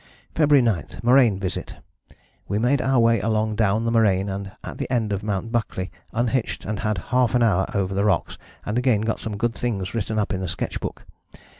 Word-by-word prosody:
"February 145 Hz, -4 st, +4 dB
9, 100 Hz, -10 st, +1 dB, 0.2 s
Moraine 120 Hz, -5 st, +5 dB
visit. 95 Hz, -2 st, -4 dB, 0.7 s
We 100 Hz, -, -1 dB
made 125 Hz, +5 st, +2 dB
our 135 Hz, 0 st, +2 dB
way 115 Hz, -1 st, +4 dB
along 110 Hz, 0 st, 0 dB
down 110 Hz, +1 st, +1 dB
the 115 Hz, -, +1 dB
moraine, 100 Hz, -4 st, +3 dB
and 100 Hz, 0 st, -5 dB
at -, -, -8 dB
the -, -, -4 dB
end 110 Hz, -5 st, +1 dB
of 100 Hz, -, -2 dB
Mt. 105 Hz, +2 st, -3 dB
Buckley 110 Hz, -6 st, -2 dB, 0.2 s
[I] 115 Hz, -, 0 dB
unhitched 120 Hz, 0 st, -1 dB
and 105 Hz, -1 st, -3 dB
had 105 Hz, -2 st, -1 dB, 0.2 s
half 125 Hz, -2 st, +3 dB
an 120 Hz, -, +4 dB
hour 95 Hz, -4 st, +2 dB
over 95 Hz, -1 st, 0 dB
the 100 Hz, +1 st, +1 dB
rocks 95 Hz, -4 st, +1 dB, 0.3 s
and 110 Hz, +4 st, 0 dB
again 125 Hz, -5 st, +2 dB
got 110 Hz, 0 st, -1 dB
some 105 Hz, -2 st, -5 dB
good 115 Hz, +2 st, 0 dB
things 105 Hz, -7 st, -3 dB
written 110 Hz, -1 st, -2 dB
up 105 Hz, -1 st, 0 dB
in 95 Hz, -1 st, -2 dB
sketch -, -, -3 dB
book. -, -, -6 dB
110 Hz, 205 wpm, -23 LUFS, 100-120 Hz, 0.7 s, Moraine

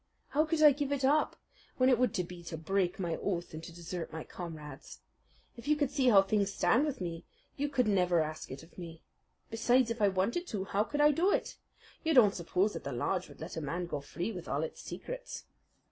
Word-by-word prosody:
How 305 Hz, +2 st, +2 dB
could 310 Hz, -1 st, +1 dB
I 300 Hz, -, +10 dB
give 285 Hz, 0 st, -2 dB
it 275 Hz, -2 st, +1 dB
up 295 Hz, +3 st, +3 dB, 0.4 s
when 255 Hz, -, +4 dB
it 255 Hz, -3 st, +4 dB
would 250 Hz, -4 st, +3 dB, 0.2 s
be 180 Hz, -1 st, -9 dB
to 165 Hz, -1 st, -5 dB
break 180 Hz, +3 st, 0 dB
my 170 Hz, -3 st, -1 dB
oath 175 Hz, -4 st, -3 dB
and 160 Hz, +1 st, -7 dB
to 170 Hz, -, -8 dB
desert 175 Hz, 0 st, -6 dB
my 160 Hz, -1 st, -5 dB
comrades? 155 Hz, -5 st, -9 dB, 0.5 s
If 235 Hz, -, -11 dB
you 300 Hz, -, +4 dB
could 290 Hz, -2 st, 0 dB
see 275 Hz, -3 st, +1 dB
how 200 Hz, -5 st, +7 dB
things 200 Hz, 0 st, +1 dB
stand 230 Hz, +12 st, +3 dB
with 285 Hz, -3 st, -3 dB
me 170 Hz, -2 st, -4 dB, 0.3 s
you 290 Hz, +1 st, -1 dB
could 255 Hz, -5 st, +1 dB
never 180 Hz, -4 st, +3 dB
ask 155 Hz, 0 st, -3 dB
it 135 Hz, +4 st, -8 dB
of 165 Hz, -, -15 dB
me. 165 Hz, -2 st, -9 dB, 0.5 s
Besides, 235 Hz, +2 st, +3 dB
if 230 Hz, -1 st, -4 dB
I 205 Hz, -, +6 dB
wanted 200 Hz, -, 0 dB
to, 200 Hz, -3 st, -3 dB
how 200 Hz, +2 st, 0 dB
could 295 Hz, +5 st, -1 dB
I 295 Hz, 0 st, +7 dB
do 340 Hz, +7 st, +2 dB
it? -, -, 0 dB, 0.5 s
You 320 Hz, -2 st, +2 dB
don't 210 Hz, -6 st, +7 dB
suppose 185 Hz, +3 st, 0 dB
that -, -, -6 dB
the 140 Hz, -, -4 dB
lodge 180 Hz, +9 st, -1 dB
would -, -, -14 dB
let 160 Hz, -, -6 dB
a -, -, -2 dB
man 170 Hz, +5 st, -2 dB
go 150 Hz, -4 st, -4 dB
free 175 Hz, +8 st, -4 dB
with 180 Hz, -5 st, -7 dB
all 145 Hz, +3 st, -1 dB
its 160 Hz, -, -6 dB
secrets?" -, -, -7 dB
195 Hz, 230 wpm, -32 LUFS, 170-265 Hz, 0.5 s, I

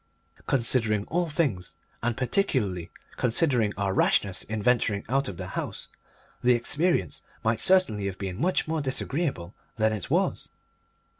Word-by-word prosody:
Considering 115 Hz, -5 st, +2 dB
all 175 Hz, 0 st, 0 dB
things, 140 Hz, -, -1 dB, 0.3 s
and 120 Hz, -1 st, -1 dB
particularly 125 Hz, -, 0 dB, 0.3 s
considering 120 Hz, -3 st, +2 dB
our 100 Hz, -1 st, 0 dB
rashness 95 Hz, 0 st, +2 dB
in 110 Hz, 0 st, -3 dB
venturing 110 Hz, -4 st, +2 dB
out 135 Hz, +3 st, +1 dB
of 95 Hz, -, -6 dB
the -, -, -6 dB
house, -, -, -5 dB, 0.5 s
the 125 Hz, 0 st, +5 dB
experience 135 Hz, -, 0 dB, 0.2 s
might 110 Hz, 0 st, +1 dB
certainly 150 Hz, -, +3 dB
have 95 Hz, -, -5 dB
been 95 Hz, -2 st, -5 dB
much 180 Hz, 0 st, +1 dB
more 160 Hz, 0 st, -1 dB
disagreeable 135 Hz, -, -2 dB, 0.2 s
than 110 Hz, -1 st, +2 dB
it 105 Hz, -4 st, -5 dB
was. -, -, 0 dB
115 Hz, 140 wpm, -27 LUFS, 100-140 Hz, 0.5 s, the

